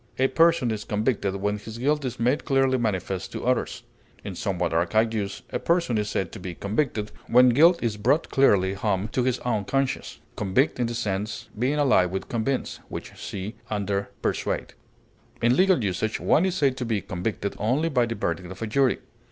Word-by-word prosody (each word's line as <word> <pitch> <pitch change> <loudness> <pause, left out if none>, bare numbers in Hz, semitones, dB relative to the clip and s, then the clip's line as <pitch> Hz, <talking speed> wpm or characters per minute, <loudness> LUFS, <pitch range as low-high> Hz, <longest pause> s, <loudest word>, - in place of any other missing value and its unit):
A 130 - +3
person 165 -7 +3
is 105 -1 -3
convicted 105 -2 -1
when 105 +1 -1
his 110 +2 -9
guilt 145 +4 +1
is 125 -1 -4
made 125 +5 +1
clearly 135 -2 +2
manifest 95 -4 -2
to - - -5
others; 125 0 0 0.4
in 100 - -5
somewhat 90 -3 -2
archaic 110 +7 +2
use, 100 -2 -3
a - - -1
person 170 -8 +1
is 105 -1 -2
said 85 -3 -2
to - - -8
be 90 -1 -6
convicted 105 - -1 0.2
when 125 +2 +6
guilt 165 +8 +6
is 110 -3 -1
brought 130 +10 +1
clearly 100 -8 +4
home 100 0 -1
to 125 - 0
his 125 0 +1
own 115 -4 0
conscience 135 +4 -1 0.2
(convict 110 +8 +1
in 120 - +1
this 120 0 -3
sense 105 -2 -3
being 130 +5 +1
allied 130 -11 +3
with 95 +1 -4
convince, 120 +3 -1
which - - -6
see 100 +2 -6 0.2
under 100 -1 -1
PERSUADE); - - -2 0.7
in 120 +2 +3
legal 185 - +4
usage 105 +3 -1
one 180 +5 +3
is 185 - -2
said 135 -7 +2
to 125 - -2
be 110 -4 0
convicted 100 +3 -3
only 130 +10 +1
by 125 -6 +2
the 115 - -3
verdict 90 -3 -3
of 95 +4 -7
a - - 0
jury. 130 +4 +2
115 Hz, 195 wpm, -25 LUFS, 100-130 Hz, 0.7 s, when